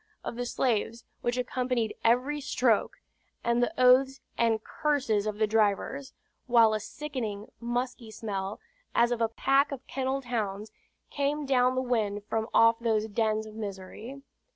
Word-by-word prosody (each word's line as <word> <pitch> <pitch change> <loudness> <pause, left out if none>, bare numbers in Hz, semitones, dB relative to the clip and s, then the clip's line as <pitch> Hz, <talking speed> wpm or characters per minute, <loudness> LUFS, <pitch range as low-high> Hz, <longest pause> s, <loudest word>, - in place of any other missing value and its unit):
of - - -5
the 245 +1 -3
slaves 235 -2 0 0.2
which 240 +1 -1
accompanied 250 -2 -1
every 255 +6 +2
stroke, 245 -5 +1 0.5
and 235 +1 +2
the 245 - +2
oaths 260 +2 +5 0.2
and 225 -2 +1
curses 255 -9 0
of 210 -1 -3
the 215 - +3
drivers; 220 +6 0 0.4
while 230 -3 +5
a 215 - 0
sickening 225 -5 -5
musky 240 0 -3
smell, 205 -2 -4 0.4
as 235 +1 +4
of 240 -1 -1
a 225 - +2
pack 275 +5 +2
of 270 -2 -6
kennelled 265 0 -2
hounds, 215 -3 -3 0.4
came 290 +1 -1
down 255 -1 +3
the 260 - 0
wind 215 -5 -1
from 220 0 -1
off 230 0 +5
those 220 -2 +1
dens 215 0 0
of 215 - -10
misery. 215 +5 -7
235 Hz, 150 wpm, -29 LUFS, 215-260 Hz, 0.5 s, oaths